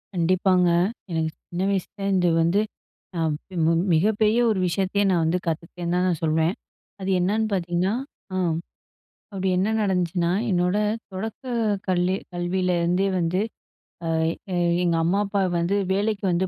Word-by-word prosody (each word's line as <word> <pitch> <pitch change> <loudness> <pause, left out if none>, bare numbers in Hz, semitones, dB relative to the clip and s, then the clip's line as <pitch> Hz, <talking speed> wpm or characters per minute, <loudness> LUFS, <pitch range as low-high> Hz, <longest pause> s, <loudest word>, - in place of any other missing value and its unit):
கண்டிப்பாங்க. 180 +1 +3 0.4
எனக்கு 160 -1 0 0.2
சின்ன 175 +2 -2
வயசுலருந்து 195 -1 0
வந்து 170 +5 +3 0.6
அ - - 0 0.3
மி - - -8
மு 165 - +4 0.2
மிகப்பெரிய 215 +6 +3
ஒரு 210 -4 +1
விஷயத்தயே 190 +3 0
நான் 175 -3 +2
வந்து 165 +3 +2
கத்துக்கிட்டேன்னு 170 +2 -3
தான் 180 +1 +2
நான் 170 -4 0
சொல்வேன். 160 +2 +2 0.5
அது 190 0 -3
என்னன்னு 210 +5 +1
பாத்தீங்கணா, 175 +1 0 0.4
ஆம், 175 -3 +1 0.8
அப்டி 190 -1 -1
என்ன 190 +4 +1
நடந்துச்சுனா, 180 -4 +1 0.2
என்னோட 180 +1 +2 0.3
தொடக்க 205 +6 -5 0.4
கல்லி 180 0 +2 0.2
கல்வியில 180 +1 0
இருந்தே 180 +3 +2
வந்து, 170 +2 0 0.7
அ - - -2 0.5
எ - - 0 0.3
எங்க 170 -1 +2
அம்மா, 180 +5 +2
அப்பா 200 0 0 0.2
வந்து 175 +4 +1 0.2
வேலைக்கு 205 +1 0
வந்து 180 +2 +1
180 Hz, 140 wpm, -24 LUFS, 170-195 Hz, 0.8 s, மு